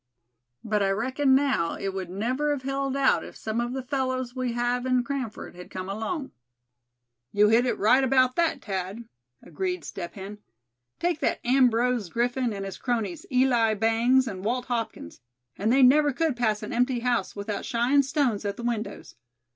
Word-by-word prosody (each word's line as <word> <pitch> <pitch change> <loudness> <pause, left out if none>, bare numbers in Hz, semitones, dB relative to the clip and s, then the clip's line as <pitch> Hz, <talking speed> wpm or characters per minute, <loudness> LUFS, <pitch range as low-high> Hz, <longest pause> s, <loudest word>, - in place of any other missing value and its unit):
"But 210 -1 0
I 195 - +2
reckon 260 +7 +2
now 265 -12 +1
it 195 -1 -4
would 190 -2 -5
never 250 +10 -1
have 285 -3 -1
held 275 0 -2
out 275 -1 +3
if - - -10
some 220 +2 -2
of 240 +1 -3
the 265 -1 -4
fellows 260 -2 -2
we 255 -2 -2
have 245 +1 0
in 255 -1 +2
Cranford 260 -4 -5
had 180 0 -11
come 185 0 -6
along." 225 - -4 1.0
"You 210 +1 +4
hit 235 +3 +4
it - - 0
right 250 +6 +4
about 255 -1 +3
that, 330 -5 0
Thad," 195 +3 -4 0.4
agreed 365 -1 -3
Step 170 - -7
Hen. 200 +1 -8 0.6
"Take 345 -2 0
that - - 0
Ambrose 245 -4 +2
Griffin 245 +4 0
and 195 -1 -5
his 195 - -7
cronies, 245 +7 -2
Eli 245 -4 +3
Bangs 230 +4 +3
and 190 -4 -6
Walt 245 +4 -1
Hopkins, 230 - -4 0.3
and 215 +3 0
they 265 +1 +5
never 290 +3 +6
could 315 0 0
pass 220 -3 0
an 210 - -5
empty 245 0 +1
house 245 -1 0
without 200 0 -4
shyin' 245 +4 +2
stones 270 -6 0
at 200 -1 -3
the 235 - -7
windows. 235 -2 -4
245 Hz, 180 wpm, -26 LUFS, 215-265 Hz, 1.0 s, never